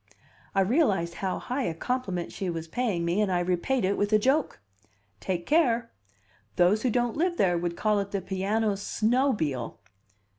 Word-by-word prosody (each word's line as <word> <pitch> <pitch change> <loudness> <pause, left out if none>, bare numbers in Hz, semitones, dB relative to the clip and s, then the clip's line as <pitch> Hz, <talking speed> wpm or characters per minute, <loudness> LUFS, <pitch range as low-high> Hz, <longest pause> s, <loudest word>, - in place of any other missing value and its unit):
I 195 - +4
realized 195 - +2
how 190 -1 -1
high 255 +3 -3
a 165 - -2
compliment 190 -3 -3
she 190 - -4
was 165 -1 -4
paying 195 -3 -1
me, 175 +5 +1
and 205 -3 +1
I 180 - +2
repaid 185 +7 0
it 195 +2 0
with 205 +1 0
a 215 - +6
joke. 265 - +1 0.6
"Take 175 -2 -3
care. 240 -7 +2 0.6
Those 185 +5 +3
who 255 - +1
don't 240 0 0
live 345 +2 0
there 180 -3 +3
would 170 0 -2
call 210 -1 +2
it 200 0 -3
the 200 - -2
piano 200 +3 -1
snobile." 205 - 0
200 Hz, 175 wpm, -27 LUFS, 175-240 Hz, 0.6 s, a